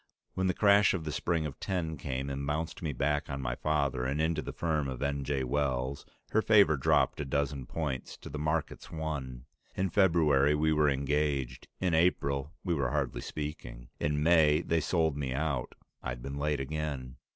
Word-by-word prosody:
When 95 0 0
the 90 - +1
crash 100 -1 +5
of 85 - -3
the 75 - -3
spring 80 +1 0
of 70 -2 -6
'10 85 -5 -2
came 70 0 -3
and 70 +1 -3
bounced 80 +2 -2
me 80 - -1
back 75 +3 0
on 70 0 -3
my - - -2
father 70 -3 0
and 70 +4 -1
into 80 0 +1
the - - -5
firm 80 -4 -1
of 65 -2 -5
N. 70 -1 -1
J. 70 -1 -1
Wells, 65 0 -1 0.2
her 110 - +3
favor 100 -8 +5
dropped 70 +2 +2
a - - -1
dozen 70 -1 -2
points 75 -6 -4
to - - -11
the 75 - -5
market's 75 +2 -2
one. 70 -6 -5 0.3
In 95 0 0
February 75 -7 +4
we 80 +1 +2
were 75 -1 +4
engaged, 70 -2 -1
in 90 -2 +1
April 70 -4 +1
we 90 - 0
were 70 -6 0
hardly - - -1
speaking. 75 -5 -6
In 75 0 0
May 80 -2 +5
they 85 -1 +1
sold 80 -3 +1
me 65 -3 -2
out. 70 -4 -2 0.3
I'd - - -5
been 70 +1 -5
late 75 0 0
again. 70 -3 -4
75 Hz, 190 wpm, -30 LUFS, 70-80 Hz, 0.3 s, crash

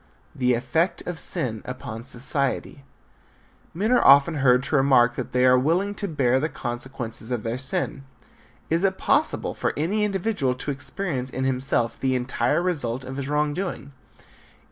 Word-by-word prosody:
VI. - - -17
THE 125 -1 +3
EFFECT 145 +9 -1
OF 175 -2 -5
SIN 110 -4 +2
UPON 120 -3 -7
SOCIETY. 135 +2 -1 0.9
Men 210 +7 0
are 250 - +4
often 140 +4 +6
heard 125 -2 +3
to 140 - -1
remark 130 -3 +4
that - - -6
they 125 0 +2
are 125 0 +5
willing 175 +9 0
to 205 - -4
bear 130 -6 +1
the 155 +4 -1
consequences 120 -3 -6
of 120 -4 -3
their 115 +2 -3
sin. 130 +1 -1 0.7
Is 165 +3 +1
it 190 -1 +1
possible 300 +2 0
for - - -2
any 195 +8 0
individual 195 - -1
to 135 +3 -4
experience 135 -1 -4
in 130 0 -4
himself 130 -3 +1
the 130 -1 0
entire 125 +7 0
result 135 -9 -2
of 130 +1 -7
his 140 0 -4
wrong 150 0 0
doing? 175 -5 -5
135 Hz, 165 wpm, -24 LUFS, 125-165 Hz, 0.9 s, often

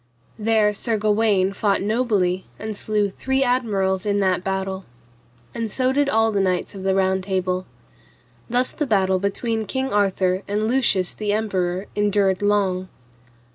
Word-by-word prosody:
There 215 -1 +2
Sir 225 +2 -1
Gawaine 210 -2 +2
fought 200 -1 0
nobly 205 -5 0
and 215 0 -5
slew 210 -1 -1
three 265 +6 0
admirals 200 -7 0
in 205 -1 0
that 185 -2 +1
battle. 190 0 -3 0.7
And 230 -1 -3
so 255 +4 0
did 285 0 +2
all 225 -2 +3
the 200 -2 +1
knights 185 -2 -1
of 195 - -8
the 190 0 +1
Round 190 0 +1
Table. 185 -1 -2 0.8
Thus 250 +2 +2
the 300 - -3
battle 190 -4 +2
between 220 +3 -2
King 265 +3 -2
Arthur 190 -2 +1
and 210 +2 -1
Lucius 225 -7 +1
the 210 -1 -2
Emperor 190 -3 -1
endured 205 -2 +1
long. 195 -3 +1
205 Hz, 150 wpm, -22 LUFS, 190-220 Hz, 0.8 s, all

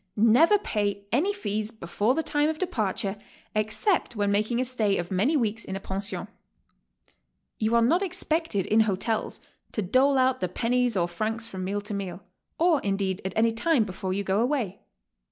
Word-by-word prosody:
Never 245 - +5
pay 205 - -2
any 310 - +2
fees 215 - -2
before 220 +3 -1
the 320 - 0
time 295 0 +1
of 315 - -2
departure 215 - -2 0.4
except 220 - 0
when 205 -1 +1
making 215 +4 +1
a 255 - +1
stay 220 -6 +1
of 175 +1 -4
man 195 +8 +2
y 320 - +2
weeks 225 -4 0
in 190 - -5
a - - -3
pension. 195 +2 -4 1.3
You 220 +1 +1
are 235 - +5
not 325 +10 +3
expected 325 - -1
in 220 - +3
hotels 220 +1 0 0.3
to 215 - -1
dole 265 +8 +3
out 260 0 +3
the 180 - -1
pennies 245 +2 +1
or 175 -1 +2
francs 220 +6 -3
from 190 -5 -6
meal 205 +2 -2
to 210 +1 -6
meal, 195 -2 -5 0.3
or, 330 -3 +3
indeed, 195 -1 -1
at 190 - -3
any 225 +1 +3
time 250 +3 +2
before 190 -2 -4
you 200 +2 -1
go 195 +3 +1
awtay. 240 -10 -2
220 Hz, 185 wpm, -26 LUFS, 200-260 Hz, 1.3 s, Never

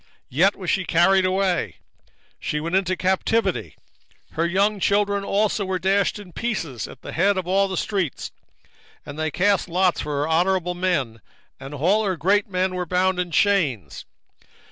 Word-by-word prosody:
3:10 - - -35 0.2
Yet 180 +10 +3
was 185 -3 -5
she 195 - 0
carried 185 +3 +3
away, 185 -1 0 0.6
she 150 - -2
went 165 +4 -2
into 185 -1 +1
captivity: 190 +5 0 0.6
her 165 +1 0
young 200 +4 +1
children 200 +1 +1
also 205 +1 0
were 190 -1 -2
dashed 195 +3 +1
in 195 -4 -12
pieces 160 - -3
at - - -14
the - - -7
top 195 +3 +2
of 185 -2 -3
all 195 +2 +2
the 190 -1 -4
streets: 190 -8 -2 0.7
and 145 +1 -8
they 155 0 0
cast 195 +3 +1
lots 180 +1 +1
for 145 -1 -2
her 150 - -1
honourable 180 +2 +1
men, 155 - -1 0.4
and 135 +2 -8
all 185 +10 +2
her 190 -4 -1
great 200 +7 +1
men 185 0 -1
were 180 -1 -3
bound 185 +1 +1
in 180 -1 -1
chains. 150 - 0
185 Hz, 170 wpm, -23 LUFS, 165-195 Hz, 0.7 s, Yet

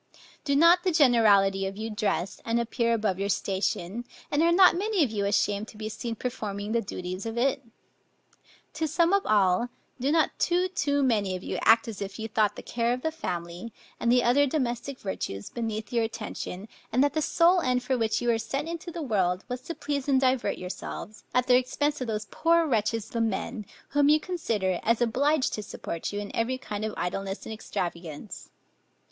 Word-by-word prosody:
Do 280 -2 +1
not 335 +4 +6
the 370 - +2
generality 205 - +4
of 195 +1 -6
you 220 +1 -4
dress, 205 -3 -2
and 230 +1 0
appear 235 0 +1
above 210 -4 -1
your 200 0 -1
station, 195 +2 -1 0.3
and 290 - +2
are 335 +1 +4
not 365 +1 +7
many 400 -1 +1
of 255 - -1
you 205 -2 -1
ashamed 205 +1 +1
to 215 - -13
be 215 0 -4
seen 230 +1 -4
performing 210 -4 -4
the 235 0 +2
duties 185 0 -5
of 225 +1 -5
it? 270 +3 +1 1.1
To 315 0 -1
sum 335 +4 +2
up 400 - +4
all, 205 +2 +3 0.3
do 270 +4 +1
not 320 0 +3
too, 360 +1 +2
too 285 -6 0
many 205 -7 +1
of 185 - -7
you - - -3
act 225 +1 +5
as 215 -3 -6
if 195 0 -5
you 220 0 -4
thought 215 -1 +1
the - - -9
care 235 0 0
of 255 - -10
a 320 - +1
family, 175 - -5 0.3
and 235 - +2
the 245 0 +4
other 280 +4 +4
domestic 255 -2 -2
virtues, 100 - -5
beneath 220 -1 -4
your 235 -1 +2
attention, 215 -3 -5 0.2
and 255 +3 +3
that 285 -1 +2
the 310 - 0
sole 345 +4 +4
end 250 -3 +1
for 260 - 0
which 225 0 0
you 240 - +1
were 230 -1 +2
sent 275 +6 -3
into 335 +1 -5
the 335 -1 -5
world, 190 -7 0
was 250 0 -4
to 325 +5 -6
please 285 -1 -3
and 270 -2 +4
divert 260 -1 +1
yourselves, 185 +3 -7
at 250 0 +2
the 250 - +5
expense 290 +3 -1
of 255 - -2
those 215 -1 -2
poor 335 +1 +3
wretches 220 -4 0
the 230 - -2
men, 225 0 -2 0.2
whom 290 0 +3
you 305 +1 +5
consider 220 - -1
as 230 0 +2
obliged 265 +5 +2
to 215 - -3
support 170 -4 -5
you 205 - -3
in 205 -1 -6
every 245 +3 0
kind 215 -5 -5
of 220 - -3
idleness 195 +2 -3
and 220 - -5
extravagance? 170 -4 -5
230 Hz, 205 wpm, -27 LUFS, 205-280 Hz, 1.1 s, not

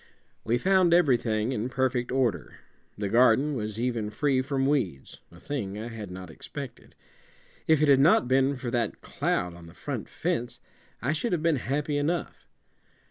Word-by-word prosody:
We 115 +2 +1
found 185 +3 +4
everything 120 -8 +2
in 125 -1 -2
perfect 130 -1 0
order 120 - -1 0.4
the 100 -1 -2
garden 125 +6 +4
was 110 -3 -4
even 115 -3 -1
free 130 +4 +1
from 135 0 -1
weeds, 120 - -1
a 85 - -15
thing 105 -8 -4
I 110 +2 -5
had 110 -4 -7
not 90 -2 -8
expected. - - -9 0.7
If 155 -1 +4
it - - +4
had 140 -2 +6
not 140 -3 +5
been 135 +2 +3
for 125 -2 -5
that 120 -3 -1
cloud 90 -1 -1
on 85 -1 -12
the 85 - -15
front - - -5
fence, 120 +1 -2 0.4
I 135 +5 +1
should 185 +6 -1
have 165 -3 -1
been 165 -3 +3
happy 145 +4 -1
enough. 160 +2 -2
125 Hz, 170 wpm, -27 LUFS, 110-145 Hz, 0.7 s, had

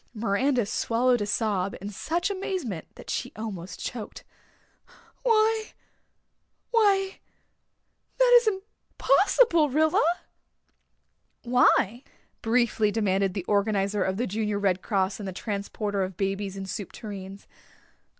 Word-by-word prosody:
Miranda 235 +3 +1
swallowed 240 +3 +1
a 205 - -1
sob 205 -3 -1
in 200 +2 -6
such 340 - -2
amazement 365 - -4
that - - -13
she - - -3
almost 195 -5 -6
choked. 225 -4 -6 1.0
"Why 445 -2 +2 1.0
why 395 -4 +2 1.0
that - - +5
is 470 - -6
impossible, 385 - +2
Rilla." 315 +3 +3 1.4
"Why?" 245 -1 +3 0.4
briefly 225 -2 +2
demanded 195 -3 0
the 190 -3 -3
organizer 200 -1 +1
of 190 0 -1
the 245 - 0
Junior 210 0 -2
Red 190 -2 +1
Cross 195 -1 -1
and 205 - -5
the - - -3
transporter 205 0 -3
of 185 -1 -3
babies 195 0 -2
in 195 - -5
soup 195 0 -5
tureens. 195 -2 -8
215 Hz, 115 wpm, -26 LUFS, 195-300 Hz, 1.4 s, that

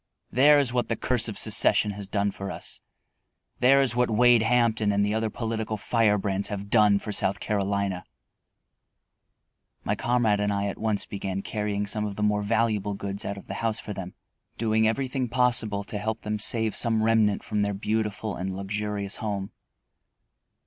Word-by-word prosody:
"There 145 +4 +6
is 135 -4 +1
what 125 -1 -1
the 115 - 0
curse 120 -1 +1
of 110 - -5
secession 105 - +3
has 100 -1 -7
done 100 0 0
for 100 0 -7
us; - - -7 0.8
there 135 +2 +5
is 125 -3 +1
what 125 -1 +2
Wade 120 +1 +5
Hampton 110 -2 +2
and 100 0 +1
the 105 - -1
other 110 0 -1
political 110 -1 -3
firebrands 100 -2 +1
have 100 -1 -6
done 105 -3 +5
for 105 - -5
South 100 -1 0
Carolina." 100 -2 -1 1.8
My - - 0
comrade 120 -4 +1
and 105 0 0
I 100 0 -1
at 100 - -4
once 110 -2 0
began 95 -1 -4
carrying 105 -1 -2
some 105 +1 -1
of 100 -1 -5
the 105 - -3
more 105 0 +1
valuable 105 -2 0
goods 100 0 -6
out 100 - -4
of 100 - -11
the - - -6
house 115 -1 0
for 105 - -6
them, 95 -2 -8 0.4
doing 110 -1 +2
everything 130 +1 -1
possible 120 -5 +1
to 105 +1 -6
help 110 +1 -3
them 105 0 -3
save 110 +1 +3
some 115 -2 +2
remnant 110 -2 +2
from 105 -2 -2
their 100 -1 -1
beautiful 105 0 -2
and 95 +1 -4
luxurious 100 +1 -3
home. 100 -3 -4
105 Hz, 175 wpm, -26 LUFS, 100-115 Hz, 1.8 s, There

